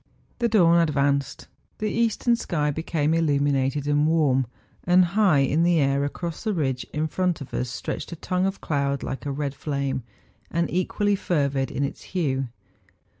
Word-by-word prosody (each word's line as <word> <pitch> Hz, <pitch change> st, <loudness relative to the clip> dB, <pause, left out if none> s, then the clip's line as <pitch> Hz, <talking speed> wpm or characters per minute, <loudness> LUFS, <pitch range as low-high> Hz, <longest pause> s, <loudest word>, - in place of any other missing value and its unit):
The 235 Hz, -1 st, +2 dB
dawn 170 Hz, -6 st, +5 dB
advanced. 140 Hz, -3 st, 0 dB, 0.3 s
The 215 Hz, -1 st, -2 dB
eastern 235 Hz, +1 st, +2 dB
sky 150 Hz, -9 st, -1 dB
became 160 Hz, 0 st, -1 dB
illuminated 145 Hz, -3 st, +1 dB
and 145 Hz, +1 st, +2 dB
warm, 140 Hz, -6 st, +2 dB, 0.4 s
and 180 Hz, +1 st, +5 dB
high 185 Hz, -5 st, +3 dB
in 140 Hz, +4 st, +2 dB
the 170 Hz, -1 st, +3 dB
air 140 Hz, 0 st, +2 dB
across 165 Hz, +3 st, -4 dB
the 215 Hz, -3 st, 0 dB
ridge 130 Hz, -6 st, -1 dB
in 150 Hz, +1 st, -1 dB
front 180 Hz, 0 st, 0 dB
of 140 Hz, -, -9 dB
us 125 Hz, -, -2 dB
stretched 120 Hz, -, -5 dB
a -, -, -4 dB
tongue 185 Hz, +3 st, -1 dB
of 195 Hz, -, -4 dB
cloud 140 Hz, -2 st, -1 dB
like 135 Hz, +2 st, -5 dB
a -, -, -1 dB
red 140 Hz, 0 st, -2 dB
flame, 140 Hz, -2 st, -2 dB, 0.5 s
and 170 Hz, +1 st, 0 dB
equally 205 Hz, +3 st, +1 dB
fervid 140 Hz, -8 st, 0 dB
in 140 Hz, -, -2 dB
its 140 Hz, -, -4 dB
hue. 135 Hz, -8 st, -1 dB
150 Hz, 170 wpm, -25 LUFS, 140-175 Hz, 0.5 s, dawn